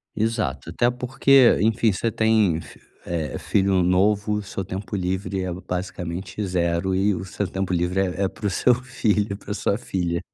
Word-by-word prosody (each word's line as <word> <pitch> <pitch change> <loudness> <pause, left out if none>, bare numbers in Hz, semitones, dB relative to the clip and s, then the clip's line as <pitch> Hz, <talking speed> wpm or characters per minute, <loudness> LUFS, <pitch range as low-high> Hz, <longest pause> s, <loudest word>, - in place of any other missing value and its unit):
Exato, 115 +1 -1
até 120 - +2
porque, 130 +1 +4
enfim, 110 +1 +3
você 105 +4 -1
tem 110 -7 +2
fi - - -14 0.3
é, 80 -4 -3
filho 95 -1 +2
novo, 100 +4 +2
o 105 - -1
seu 95 -1 -5
tempo 95 +2 -5
livre 95 +1 -2
é 90 -1 -3
basicamente 90 +1 -5
0 90 0 0
e 100 +2 +2
o - - -5
seu 95 +1 -3
tempo 95 0 -3
livre 90 +2 0
é 95 +1 -1
é - - +3
para 105 - -9
o - - +1
seu 125 +5 +3
filho, 105 -5 0
para 105 - -9
a - - 0
sua 100 0 0
filha. 90 -7 -2
95 Hz, 185 wpm, -23 LUFS, 90-105 Hz, 0.3 s, porque